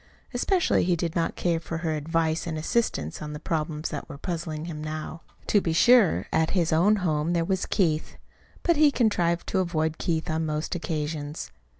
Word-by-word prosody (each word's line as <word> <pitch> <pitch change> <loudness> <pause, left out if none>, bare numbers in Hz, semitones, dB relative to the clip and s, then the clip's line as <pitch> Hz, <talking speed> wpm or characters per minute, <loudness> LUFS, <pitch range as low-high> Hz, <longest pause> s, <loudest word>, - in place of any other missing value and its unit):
Especially 350 +9 +2
he 180 0 +2
did 165 -1 -3
not 165 - 0
care 170 -2 0
for 165 0 -5
her 160 - +1
advice 160 +2 0
and 160 -1 -3
assistance 155 - -1
on 150 0 -5
the 150 - -6
problems 155 -1 -2
that - - -6
were 145 - -8
puzzling 160 -1 -4
him 155 -3 -6
now. 155 +1 -5 0.2
To 205 - +3
be 165 - -1
sure, 235 +1 +5
at 160 0 +2
his 170 -2 +2
own 190 +7 +4
home 155 +1 +1
there 170 -1 +1
was 190 +1 -1
Keith; 160 -6 0 0.5
but 340 -3 +3
he 300 -1 +6
contrived 180 -10 +1
to 190 - +1
avoid 160 -3 -1
Keith 165 -1 -1
on 160 -1 -1
most 155 0 -2
occasions. 155 -2 -4
165 Hz, 190 wpm, -26 LUFS, 155-175 Hz, 0.5 s, he